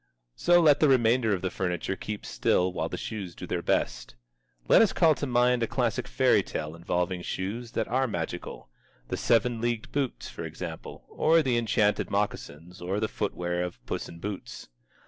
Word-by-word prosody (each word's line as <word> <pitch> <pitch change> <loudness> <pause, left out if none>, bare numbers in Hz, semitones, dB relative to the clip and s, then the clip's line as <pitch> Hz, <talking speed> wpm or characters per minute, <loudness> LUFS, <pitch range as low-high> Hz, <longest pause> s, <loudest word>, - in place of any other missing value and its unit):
So 175 - +4
let 150 -4 +5
the 155 - +4
remainder 120 -2 +3
of 90 - -7
the 95 - -1
furniture 90 0 -2
keep 105 +2 -6
still 90 0 +1
while - - -2
the - - -4
shoes 95 -6 -6
do - - -7
their - - -2
best. - - -1 0.5
Let - - +7
us 220 - +3
call 165 -3 +5
to 145 - -4
mind 125 0 +3
a 115 - +1
classic - - -1
fairy - - +3
tale 75 +1 -5
involving 90 +2 -2
shoes 110 +7 -4
that 110 - -1
are 130 +2 +1
magical: 85 -7 -5 0.4
The - - -2
Seven 115 0 +2
Leagued 120 -2 -2
Boots, 140 -3 -2
for - - -7
example, 80 0 -7
or 160 +1 +3
The 130 -3 +1
Enchanted 110 -2 +1
Moccasins, 85 +6 -3
or 95 +3 -2
the 110 - 0
footwear 90 -5 -2
of 90 -1 -4
Puss - - -4
in 85 - -10
Boots. 100 -5 -7
105 Hz, 185 wpm, -28 LUFS, 90-125 Hz, 0.5 s, Let